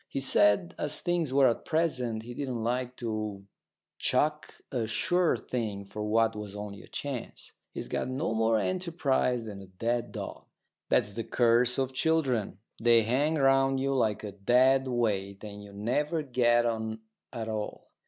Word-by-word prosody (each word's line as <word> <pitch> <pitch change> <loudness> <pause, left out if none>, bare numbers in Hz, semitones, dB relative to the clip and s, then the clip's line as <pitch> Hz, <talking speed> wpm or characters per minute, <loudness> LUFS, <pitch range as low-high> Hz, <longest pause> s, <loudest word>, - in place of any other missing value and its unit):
He - - -3
said, 135 - +4
as 150 0 +1
things 175 -5 0
were 135 0 +5
at 115 - 0
present, 125 -9 -1
he 120 +1 -8
didn't 125 -3 -3
like 125 +1 -1
to 110 -4 -4 0.5
chuck 150 0 0 0.2
a 120 -5 -1
sure 175 +10 +2
thing 105 -5 -4
for 105 +2 -6
what 115 +1 +2
was 105 -1 -6
only 105 -1 -7
a - - -15
chance. 140 -4 -6 0.2
He's - - -6
got - - -2
no 135 +2 -1
more 110 0 +2
enterprise 145 - 0
than 100 -3 -7
a 95 - -11
dead 115 +5 -2
dog. - - -7 0.4
That's 105 - +2
the 115 - -3
curse 120 +1 +3
of 130 -1 -1
children. 130 - +1 0.2
They 115 -1 +5
hang 140 +8 +1
round 135 -1 +3
you 135 +1 0
like 110 -6 +1
a 105 - -5
dead 130 +7 +3
weight, 100 -5 -1
and 105 -1 -8
you 100 - -12
never 145 +10 -1
get 120 -3 +3
on 110 -1 -2 0.3
at 115 -2 -5
all. 110 -1 -5
120 Hz, 165 wpm, -29 LUFS, 110-135 Hz, 0.5 s, were